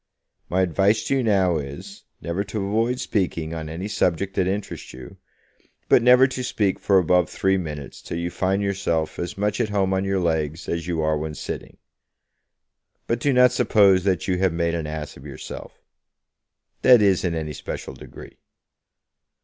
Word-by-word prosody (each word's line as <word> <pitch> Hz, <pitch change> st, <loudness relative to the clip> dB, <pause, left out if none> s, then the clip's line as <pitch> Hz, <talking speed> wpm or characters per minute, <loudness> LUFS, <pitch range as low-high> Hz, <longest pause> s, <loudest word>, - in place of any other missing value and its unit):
My 95 Hz, +2 st, +1 dB
advice 100 Hz, +5 st, +2 dB
to 135 Hz, -, 0 dB
you 130 Hz, -, 0 dB
now 95 Hz, -6 st, +2 dB
is, 85 Hz, +8 st, -8 dB, 0.2 s
never 85 Hz, +5 st, -2 dB
to 100 Hz, -1 st, -3 dB
avoid 115 Hz, +5 st, 0 dB
speaking 90 Hz, -9 st, -2 dB
on 80 Hz, -1 st, -5 dB
any 85 Hz, +5 st, -5 dB
subject 95 Hz, -1 st, 0 dB
that 90 Hz, -, +1 dB
interests 100 Hz, +2 st, -4 dB
you, 65 Hz, -1 st, -11 dB, 0.7 s
but -, -, +6 dB
never 125 Hz, +2 st, +7 dB
to 130 Hz, -1 st, -3 dB
speak 105 Hz, -5 st, 0 dB
for 100 Hz, -, +3 dB
above 90 Hz, -1 st, +3 dB
three 95 Hz, 0 st, +1 dB
minutes 75 Hz, -5 st, -7 dB
till 85 Hz, -, -6 dB
you 85 Hz, +1 st, -3 dB
find 95 Hz, +3 st, 0 dB
yourself 95 Hz, -5 st, -1 dB
as 85 Hz, -, -4 dB
much 105 Hz, +3 st, 0 dB
at 110 Hz, -, -1 dB
home 95 Hz, -2 st, +1 dB
on 95 Hz, 0 st, 0 dB
your 95 Hz, 0 st, 0 dB
legs 80 Hz, -1 st, -1 dB
as 85 Hz, 0 st, -3 dB
you 85 Hz, -2 st, -1 dB
are 75 Hz, -1 st, +1 dB
when 75 Hz, 0 st, -5 dB
sitting. -, -, -7 dB, 1.3 s
But 115 Hz, -, -1 dB
do 145 Hz, -, +1 dB
not 125 Hz, -1 st, +5 dB
suppose 100 Hz, -6 st, +4 dB
that 95 Hz, -1 st, 0 dB
you 90 Hz, -1 st, 0 dB
have 95 Hz, -1 st, +2 dB
made 85 Hz, 0 st, 0 dB
an 80 Hz, -2 st, -3 dB
ass 75 Hz, -1 st, -6 dB
of 65 Hz, -, -14 dB
yourself, 70 Hz, -, -9 dB, 1.0 s
that 125 Hz, -2 st, +7 dB
is, 100 Hz, -3 st, +3 dB
in 85 Hz, -3 st, -1 dB
any 75 Hz, -1 st, -4 dB
special -, -, -6 dB
degree. -, -, -12 dB
95 Hz, 180 wpm, -23 LUFS, 80-100 Hz, 1.3 s, never